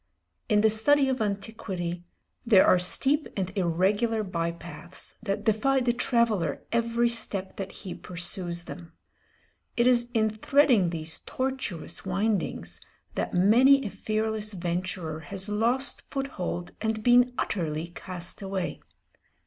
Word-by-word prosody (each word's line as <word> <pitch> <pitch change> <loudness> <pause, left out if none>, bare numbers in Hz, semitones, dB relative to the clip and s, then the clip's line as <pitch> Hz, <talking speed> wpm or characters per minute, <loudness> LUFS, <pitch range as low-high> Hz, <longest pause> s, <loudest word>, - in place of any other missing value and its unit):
In 210 -2 +4
the 220 - +5
study 270 +6 +4
of 260 -3 -1
antiquity 195 -4 -3 0.4
there 215 -6 +6
are 180 - +5
steep 275 - +2
and 185 0 -2
irregular 200 +5 +1
by 170 -4 -2
paths 170 0 -8
that 205 -1 -2
defy 225 +6 +2
the 245 -2 +1
traveller 230 - +1
every 235 0 +2
step 215 -5 0
that 195 -1 -5
he 185 - -8
pursues 175 0 -3
them. 170 -1 -10 0.8
It 235 - +3
is 240 -1 +3
in 220 -1 +3
threading 230 - +3
these 160 -1 -3
tortuous 260 -10 -4
windings 190 - -2 0.3
that - - -2
many 250 +9 +5
a 205 - -3
fearless 215 -1 -2
venturer 175 -2 -3
has 190 +5 -4
lost 235 +6 0
foot 275 0 -3
hold 175 -5 -4
and 220 0 -1
been 245 +1 +5
utterly 165 -3 -2
cast 175 +2 -6
away. 190 -2 -3
205 Hz, 135 wpm, -27 LUFS, 175-235 Hz, 0.8 s, there